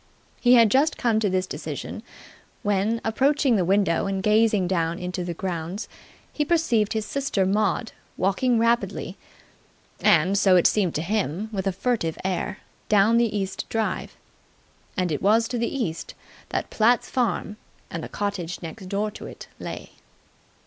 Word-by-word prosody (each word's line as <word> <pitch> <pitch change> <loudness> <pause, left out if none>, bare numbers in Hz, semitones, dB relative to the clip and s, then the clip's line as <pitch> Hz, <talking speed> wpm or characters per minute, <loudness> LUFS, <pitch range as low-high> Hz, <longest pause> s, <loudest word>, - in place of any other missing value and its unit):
He 245 0 +6
had 230 -3 +6
just 290 +4 +3
come 230 -3 +2
to 210 -2 +1
this 185 0 0
decision, - - -6 0.6
when, 205 +3 +1
approaching 270 +3 +2
the 190 - +2
window 195 -1 +2
and 195 -1 -2
gazing 210 -3 +3
down 170 -2 0
into 180 0 -4
the 175 -1 -4
grounds, 175 +3 -4 0.5
he 300 - 0
perceived 290 -10 +1
his 220 -1 -2
sister 270 -7 0
Maud 215 +4 0 0.3
walking 215 +7 +2
rapidly 230 +1 0 0.8
and, 175 +4 +4
so 190 -2 +5
it 175 - +4
seemed 195 -6 +2
to 155 - -1
him, 205 +1 -1
with 195 -1 -2
a - - +2
furtive 185 -5 -1
air 190 +1 -2 0.3
down 215 +2 +5
the 225 -3 +1
east 195 -1 -4
drive. 225 -1 -2 0.8
And 180 -3 0
it 150 - -2
was 220 +4 +3
to 245 - -2
the 235 - -1
east 185 -12 -4 0.3
that - - -3
Platt's 235 +2 +3
farm 225 -4 -1 0.3
and 165 -1 -4
the - - -6
cottage 200 -4 -3
next 185 +4 -8
door 210 +2 -1
to - - -9
it - - -11
lay. - - -7
205 Hz, 160 wpm, -24 LUFS, 185-230 Hz, 0.8 s, He